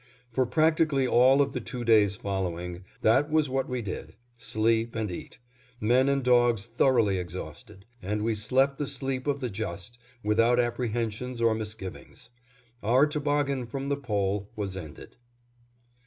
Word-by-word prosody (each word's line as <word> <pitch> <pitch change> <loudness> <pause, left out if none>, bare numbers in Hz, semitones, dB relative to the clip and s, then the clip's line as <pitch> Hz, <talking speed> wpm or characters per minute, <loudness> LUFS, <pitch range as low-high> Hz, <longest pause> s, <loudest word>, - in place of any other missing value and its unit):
For 130 +2 +1
practically 155 0 +2
all 130 +3 +5
of 140 -1 -5
the 125 - -3
two 120 +2 -6
days 105 -4 +4
following, 90 -2 -4 0.2
that 140 +7 +4
was 155 -2 +2
what 135 +1 -1
we 125 -2 -2
did: 95 - -6 0.2
sleep 115 0 0
and 110 -4 -2
eat; 85 - -8 0.4
men 125 +5 +3
and 140 -1 +1
dogs 120 -4 +3
thoroughly 115 -4 +2
exhausted; 90 +2 -8 0.2
and 105 +3 -2
we 115 0 +1
slept 130 +6 +1
the 145 - -1
sleep 135 0 -3
of 140 0 0
the 125 - -2
just, 100 +2 -6 0.2
without 115 +3 +3
apprehensions 120 0 -2
or 115 -1 +3
misgivings. 110 -1 -8 0.5
Our 125 +7 +4
toboggan 145 -3 -1
from 135 +4 -4
the 140 - +1
Pole 100 -6 -2
was 100 -3 -4
ended. 80 -6 -10
120 Hz, 150 wpm, -27 LUFS, 105-135 Hz, 0.5 s, all